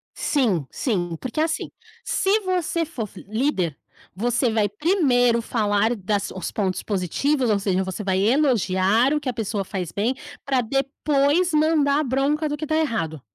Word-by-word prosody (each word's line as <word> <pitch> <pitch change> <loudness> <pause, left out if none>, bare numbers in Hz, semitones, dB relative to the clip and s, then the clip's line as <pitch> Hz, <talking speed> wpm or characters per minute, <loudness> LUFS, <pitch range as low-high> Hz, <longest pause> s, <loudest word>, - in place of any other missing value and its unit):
Sim, 215 - +1
sim, 175 -9 -1
porque 255 +4 -4
assim, 320 0 -1 0.3
se 400 +3 +1
você 355 -3 -1
for 230 - -5
líder, 205 - -1 0.4
você 240 +3 +1
vai 215 -2 +2
primeiro 245 - +2
falar 215 -1 +1
dos 195 -2 -3
pontos 190 -3 -2
positivos, 230 - 0
ou 205 -1 +2
seja, 190 -1 0
você 190 +3 -5
vai 190 -1 +1
elogiar 225 -1 +3
o 300 - +1
que 270 - -3
a - - -2
pessoa 215 -3 -2
faz 185 -3 -5
bem, 230 +6 0 0.3
para 265 -3 +2
depois 280 +6 +1
mandar 300 -2 +3
a - - +1
bronca 280 +4 0
do 295 - -2
que 310 - -4
está 310 - -1
errado. 165 - -1
240 Hz, 155 wpm, -23 LUFS, 200-295 Hz, 0.4 s, elogiar